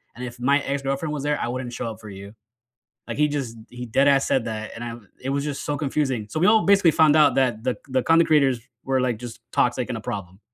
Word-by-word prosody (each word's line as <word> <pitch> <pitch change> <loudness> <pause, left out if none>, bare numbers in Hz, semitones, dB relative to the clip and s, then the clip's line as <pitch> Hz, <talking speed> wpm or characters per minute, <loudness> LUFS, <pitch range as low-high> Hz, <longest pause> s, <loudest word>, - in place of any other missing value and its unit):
and 125 - -6
if 120 0 -9
my 140 +3 +3
ex-girlfriend 140 +2 -2
was 150 - -3
there, 145 0 0
I - - -2
wouldn't 125 0 -4
show 120 - -4
up 110 - -11
for 110 -1 -11
you." 100 +1 -10 0.7
Like, - - -5
he 150 0 +4
just 135 -6 -4
he 125 0 -7
deadass 135 +4 +4
said 125 - +1
that, 110 -2 -5
and 115 - -7
I 120 -1 -5 0.3
it 130 - -4
was 140 +1 0
just 145 -2 -4
so 145 - -1
confusing. 135 -6 -1
So 155 - -3
we 180 - +4
all 220 0 +5
basically 195 -4 +5
found 155 -1 +4
out 150 -2 +5
that 120 -4 +1
the 125 -1 -1
the 130 0 +1
content 165 +1 +4
creators 140 -5 +3 0.3
were, 135 0 +1
like, 125 -3 0
just 120 -1 -8
toxic 125 0 +1
and - - -2
a - - -7
problem, 100 -5 -6
130 Hz, 250 wpm, -23 LUFS, 120-145 Hz, 0.7 s, all